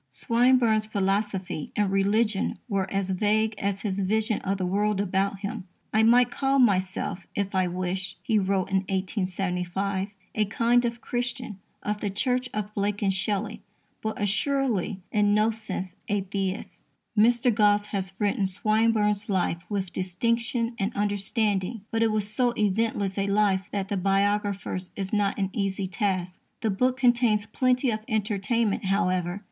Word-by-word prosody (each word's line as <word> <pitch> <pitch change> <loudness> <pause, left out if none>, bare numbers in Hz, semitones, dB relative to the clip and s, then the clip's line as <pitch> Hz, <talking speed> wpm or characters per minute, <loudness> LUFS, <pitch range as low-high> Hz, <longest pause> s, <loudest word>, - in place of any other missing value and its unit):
Swinburne's 230 - +3
philosophy 195 -4 -1
and 205 -2 +1
religion 200 +1 +1
were 195 -4 -1
as 195 -1 -1
vague 215 +3 +2
as 200 0 -1
his 200 -2 -2
vision 215 +2 +1
of 195 +1 -1
the 185 - -1
world 205 +2 +1
about 195 0 0
him. 200 -2 -5 0.3
"I 220 - +4
might 240 +2 +5
call 275 0 +1
myself, 190 -4 +1
if 200 0 -2
I 185 -1 +2
wished," 185 +1 -3
he 220 -4 +2
wrote 195 0 0
in 195 - +3
1875, 190 0 -1 0.3
"a 215 - +1
kind 235 +4 +2
of 235 0 -3
Christian 245 -4 -3 0.2
(of 210 0 -2
the 205 - -1
Church 250 +5 0
of 210 0 -4
Blake 205 0 -1
and 195 -1 +2
Shelley), 200 +2 -1 0.4
but 220 0 -3
assuredly 205 -1 0
in 205 -1 +3
no 215 +2 +3
sense 195 -4 -5
a 205 -1 +1
Theist." 195 0 -4 0.3
Mr. 235 +2 +4
Gosse 205 0 +3
has 195 -2 -3
written 205 -2 +1
Swinburne's 215 +1 +1
life 180 -3 0
with 195 -3 -3
distinction 230 +6 -1
and 195 +2 0
understanding; 205 +1 0
but 225 - 0
it 225 -1 +3
was 210 -1 -1
so 240 +3 0
eventless 205 -1 0
a 195 - 0
life 200 -1 +2
that 195 -1 -2
the 205 - -1
biographer's 195 -1 0
is 195 0 -4
not 205 -1 +1
an 195 -2 -1
easy 195 -1 -1
task. 185 -1 -2 0.2
The 220 - +1
book 250 +6 +1
contains 240 -4 +3
plenty 250 +3 +1
of 215 - -1
entertainment, 215 0 0
however. 185 -1 0
205 Hz, 155 wpm, -26 LUFS, 195-220 Hz, 0.4 s, might